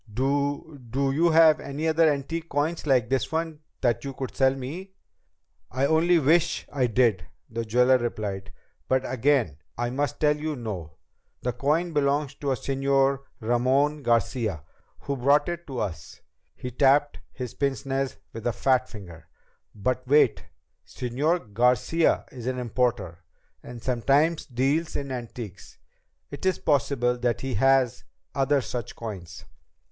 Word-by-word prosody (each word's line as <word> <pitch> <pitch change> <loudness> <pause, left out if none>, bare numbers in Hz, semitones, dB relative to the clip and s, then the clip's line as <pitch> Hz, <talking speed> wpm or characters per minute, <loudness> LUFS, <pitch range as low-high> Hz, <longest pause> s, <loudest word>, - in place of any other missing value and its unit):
"Do 140 +4 -1
do 135 +3 -1
you 165 +5 +3
have 160 -1 +6
any 145 +3 -3
other 160 0 +4
antique 160 +4 -4
coins 155 +3 -1
like 125 -5 +3
this 135 - 0
one 160 -1 -2 0.2
that 120 -3 +1
you 135 -1 -6
could 130 -1 -5
sell 135 0 +3
me?" 165 +9 -7 0.8
"I 130 +3 0
only 165 +4 +4
wish 165 +3 +2
I 130 -3 +2
did," 110 -8 +2 0.2
the 115 0 -4
jeweler 125 +3 +4
replied. 100 -5 -4 0.4
"But 130 0 +2
again 130 - +1 0.2
I 120 0 -1
must 140 0 -2
tell 150 -1 +3
you 150 0 -3
no. 100 - -6 0.5
The 125 - -1
coin 155 +7 0
belongs 145 0 +1
to 140 0 -4
a - - +2
Señor 135 +1 +1 0.2
Ramon 130 +6 +2
Garcia 115 - 0 0.4
who 140 - -3
brought 140 +4 +3
it 175 0 -5
to 130 -4 -5
us." 85 -7 -5 0.3
He 125 - -6
tapped 140 +3 +3
his 125 -3 -6
pince 140 -3 -2
nez 135 0 -2 0.2
with 115 +1 -4
a 120 - +1
fat 130 +3 +1
finger. 85 -7 -11 0.5
"But 130 +5 -2
wait! 145 +3 +4 0.4
Señor 130 - -2
Garcia 125 +8 +2
is 125 -2 -8
an 130 0 -1
importer, 120 -8 -1 0.4
and 120 -2 -10
sometimes 140 +6 +2
deals 140 +6 0
in 140 -1 -3
antiques. 115 -6 -7 0.5
It 145 - -8
is 185 - +2
possible 125 -4 +1
that 120 -1 0
he 135 -1 -3
has 135 +1 +3 0.3
other 140 +1 +2
such 120 -1 -5
coins." 95 -8 -8
135 Hz, 150 wpm, -26 LUFS, 120-145 Hz, 0.8 s, have